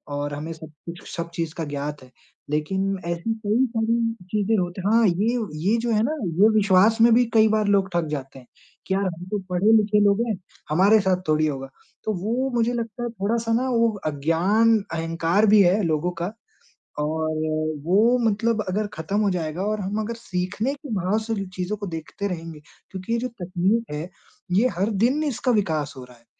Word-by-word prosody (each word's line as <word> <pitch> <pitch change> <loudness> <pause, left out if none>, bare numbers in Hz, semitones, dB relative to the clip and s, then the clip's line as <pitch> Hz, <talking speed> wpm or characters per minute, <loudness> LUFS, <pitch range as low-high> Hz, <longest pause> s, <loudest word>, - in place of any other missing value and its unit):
और 145 0 -3
हमें 155 +3 -5
सब 160 0 -11 0.2
कुछ 170 +1 -9
सब 170 -1 -4
चीज़ 165 -2 -3
का 165 - -3
ज्ञात 145 -1 -5
है। 125 - -17 0.4
लेकिन 190 +6 -1
ऐसी 170 +6 -2
कई 230 +6 +3
सारी 225 0 0 0.4
चीज़ें 215 +1 +1
होत 175 -1 -1
हाँ, 225 +2 +4
ये 210 +8 +1 0.3
ये 230 - +3
जो 235 -1 -1
है 215 -1 +3
ना 285 - 0 0.3
ये 215 - +8
विश्वास 210 +2 +4
में 230 0 +7
भी 245 +1 +5
कई 220 -1 +6
बार 215 -1 +1
लोग 195 -1 +2
ठग 170 -2 0
जाते 135 -2 -5
हैं 125 - -18 0.4
कि 190 - 0
यार 195 +1 +1
हम 175 -1 -4
तो 210 - 0
पढ़े-लिखे 210 +3 +3
लोग 200 +3 +3
हैं, 215 - 0 0.3
हमारे 195 +7 +5
साथ 185 -1 +1
थोड़ी 155 0 +2
होगा। 135 -2 -4 0.3
तो 215 - -1
वो 250 +5 0
मुझे 235 +1 +2
लगता 235 0 -4
है 240 - -2
थोड़ा-सा 225 +2 -1
ना 255 +3 +1
वो 230 -1 +3 0.2
अज्ञान 175 +10 +2 0.2
अहंकार 165 +5 +1
भी 210 - +8
है 190 +3 +4
लोगों 165 +2 0
का - - 0 0.7
और 155 +1 -1 0.5
वो 215 +8 +4
मतलब 225 +1 0
अगर 210 +3 -1
खत्म 195 +6 -2
हो 205 - +2
जाएगा 165 0 -3
और 215 0 -1
हम 200 +3 -2
अगर 230 +2 -3
सीखने 210 +4 -2
के 285 0 -11
भाव 190 +3 0
से 225 0 -3
जो 195 -1 -3
चीज़ों 190 +3 -3
को 200 -1 -5
देखते 165 +5 -5
रहेंगे। 165 -4 -6 0.3
क्योंकि 190 +4 -5
ये - - +2
जो 255 - -2
तकनीक 195 +1 -1
है, 155 +5 -4 0.4
ये 210 +7 +4
हर 195 +4 +1
दिन 280 +6 +2
इसका 260 -3 0
विकास 160 - 0
हो 130 - -8
रहा 125 -1 -15
है 115 - -28
195 Hz, 200 wpm, -24 LUFS, 165-225 Hz, 0.7 s, ये